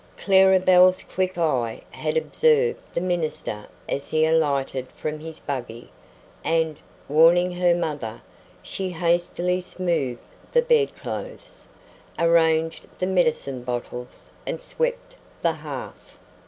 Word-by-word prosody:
Clara 190 -1 +5
Belle's 185 0 +5
quick 185 -1 -2
eye 130 -9 0
had - - -2
observed 470 -1 +1
the - - +2
minister 160 - -2 0.2
as 140 - -3
he 155 0 +2
alighted 140 -5 +1
from 155 +3 -5
his 160 0 -8
buggy, 120 -4 -6 0.5
and, 160 -2 +1 0.3
warning 170 +4 +5
her 175 -1 +2
mother, 145 -10 -3 0.4
she 190 -1 -4
hastily 175 +1 0
smoothed 170 -9 -3 0.2
the 485 -1 +4
bedclothes, 480 +1 -2 0.5
arranged 165 -1 +2
the 185 - -1
medicine 160 -8 0
bottles, 125 0 -6 0.2
and - - -2
swept - - -3 0.3
the - - +3
hearth. - - -9
170 Hz, 115 wpm, -24 LUFS, 145-185 Hz, 0.5 s, Clara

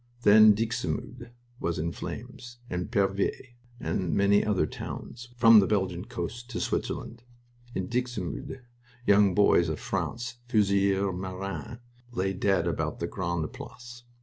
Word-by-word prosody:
Then 105 0 +8
Dixmude 115 - -3 0.3
was 85 - -1
in 85 +2 -1
flames, 120 +5 -8
and 90 0 -3
Pervyse, 100 +5 0 0.3
and 90 -7 -1
many 100 +1 +4
other 95 -7 +1
towns 120 +10 -7
from 115 -2 +8
the 95 - +3
Belgian 95 -3 -1
coast 120 0 -6
to 120 - -4
Switzerland. 115 +1 -3 0.5
In 95 - -2
Dixmude 120 - -3 0.4
young 100 -2 +5
boys 90 -4 +4
of 80 - -3
France 120 +1 -3
fusiliers 100 -3 +2
marins 95 +5 -5 0.3
lay 95 -2 0
dead 95 0 +1
about - - -2
the - - -1
Grande 85 -4 -3
Place. 120 0 -10
100 Hz, 130 wpm, -28 LUFS, 95-120 Hz, 0.5 s, Then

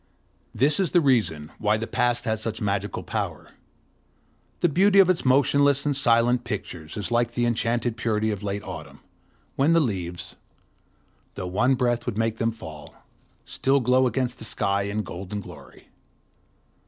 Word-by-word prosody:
This 145 - +2
is 190 -4 0
the 175 - +6
reason 110 - +1
why 105 +1 +2
the 110 - -3
Past 120 +1 0
has 110 -1 -1
such 110 -1 -3
magical 100 0 -2
power. - - -4 1.1
The 175 - +4
beauty 195 +6 +3
of 190 -2 +7
its 180 - -2
motionless 140 +1 +3
and 145 -1 +1
silent 120 -1 +3
pictures 85 -5 -6
is 105 +2 -4
like 120 0 +1
the 120 0 0
enchanted 120 0 0
purity 110 -2 0
of 105 -2 -4
late 100 0 -3
autumn, 90 -6 -9 0.6
when 145 +5 +3
the 165 - +5
leaves, 90 - -3 1.0
though 95 - -5
one 125 +9 +2
breath 120 -2 0
would 115 -4 -2
make 115 0 0
them 115 +1 0
fall, 80 -10 -11 0.5
still 135 +1 +1
glow 130 +1 +3
against 125 -1 -2
the - - -7
sky 100 -1 -1
in 105 +1 -2
golden 95 +3 -6
glory. 100 - -13
115 Hz, 160 wpm, -25 LUFS, 100-130 Hz, 1.1 s, of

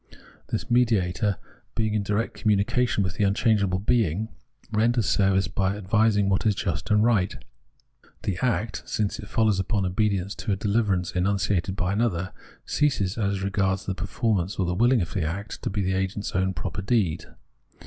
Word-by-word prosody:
This 120 - -3
mediator, 105 -5 +2 0.4
being 110 -1 0
in 105 - +1
direct 105 +3 -1
communication 105 +1 +1
with 90 -2 -3
the 105 - +1
unchangeable 100 -1 +2
Being, 105 -1 +1 0.4
renders 115 +1 +2
service 95 -1 +2
by 100 +1 -1
advising 105 0 +2
what 100 +1 +1
is 105 -2 +2
just 90 -5 -3
and 105 0 +4
right. 110 -5 +2 0.9
The 95 -4 -2
act, 115 -3 0
since 105 -2 -1
this - - -9
foUows 110 -4 +2
upon 95 +1 0
obedience 100 +1 0
to 110 - -3
a 95 - +1
dehver 105 +1 +1
ance 90 -1 -3
enunciated 95 0 0
by 90 0 -1
another, 95 -5 -1 0.3
ceases, 105 -11 +1
as 100 -2 0
regards 95 -1 0
the 95 - -1
per 95 +1 -5
formance 100 -6 -1
or 95 - +2
the 90 0 -1
wilhng 120 0 +3
of 80 - -7
the 95 - -1
act, 95 +7 -4
to - - -2
be 100 +1 -1
the 95 0 0
agent's 95 +2 -2
own 95 +1 0
proper 95 0 -4
deed. 95 -6 0
100 Hz, 175 wpm, -25 LUFS, 95-110 Hz, 0.9 s, and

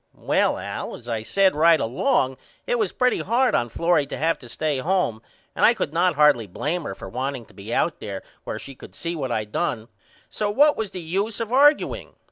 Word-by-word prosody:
Well - - +1
Al - - -5
as 120 - -14
I 115 -2 -2
said 190 - +2
right 165 +1 +5
along 130 - +1 0.3
it - - 0
was 430 - 0
pretty 250 0 +1
hard 250 +3 +1
on 120 - +1
Florrie 165 +3 +1
to - - -5
have 165 +2 0
to 120 - -13
stay 150 +2 -1
home 160 - 0 0.3
and - - -1
I 235 - +6
could 170 -8 -3
not 175 0 +2
hardly 145 -7 +4
blame 150 - -3
her - - -5
for - - -9
wanting 130 0 -4
to - - -21
be 100 +2 -9
out 165 +6 0
there 100 -2 -6 0.2
where - - -4
she 135 - -9
could - - -14
see 170 0 -4
what 135 -5 -3
I 110 -2 -1
done 110 +2 -3 0.4
so 210 -1 -2
what 290 +8 +4
was 220 -2 -3
the 185 - -7
use 195 +7 -2
of 230 -2 -3
argueing? 285 +4 +3
160 Hz, 220 wpm, -23 LUFS, 125-205 Hz, 0.4 s, I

